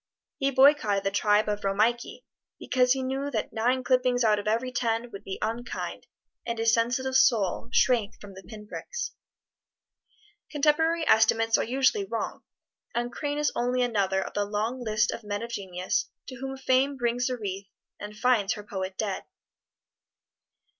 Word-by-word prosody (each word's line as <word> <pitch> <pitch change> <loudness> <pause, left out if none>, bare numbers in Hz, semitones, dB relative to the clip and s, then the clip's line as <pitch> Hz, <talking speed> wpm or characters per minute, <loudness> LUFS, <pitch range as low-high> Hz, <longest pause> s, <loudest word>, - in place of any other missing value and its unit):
He 275 - +2
boycotted 265 -7 +4
the 195 - 0
tribe 210 +1 +2
of 210 0 -2
Romeike, 215 +5 0 0.4
because 250 -1 +2
he 265 -1 -3
knew 270 +2 -2
that 225 -6 -3
nine 245 +3 +1
clippings 250 -1 +2
out 215 -2 +3
of 205 - -6
every 235 +4 0
ten 235 -1 -1
would 200 - -9
be 190 - -5
unkind, 230 +3 -4 0.4
and 235 -1 -3
his 225 0 +2
sensitive 250 +3 0
soul 230 -5 +3
shrank 230 -6 +2
from 205 -1 -11
the 190 - -11
pin 210 +3 -11
pricks. 485 - -5 1.4
Contemporary 320 +3 +2
estimates 225 +1 +4
are - - +2
usually 265 - +2
wrong, - - -4 0.5
and 240 +1 -1
Crane 290 +2 -3
is 295 0 +1
only 250 +1 +1
another 195 -5 +1
of - - -8
the 205 - 0
long 215 +5 -2
list 215 -1 +1
of 235 - -7
men 205 +1 -3
of 235 - -6
genius 185 -4 -2 0.2
to 255 - -8
whom 270 +1 -5
Fame 265 +1 +2
brings 245 0 0
a 250 - -2
wreath 195 -3 -5 0.3
and 210 +1 -8
finds 220 -4 +2
her 210 - -8
poet 190 -2 -5
dead. 205 -3 -3
235 Hz, 165 wpm, -27 LUFS, 210-255 Hz, 1.4 s, boycotted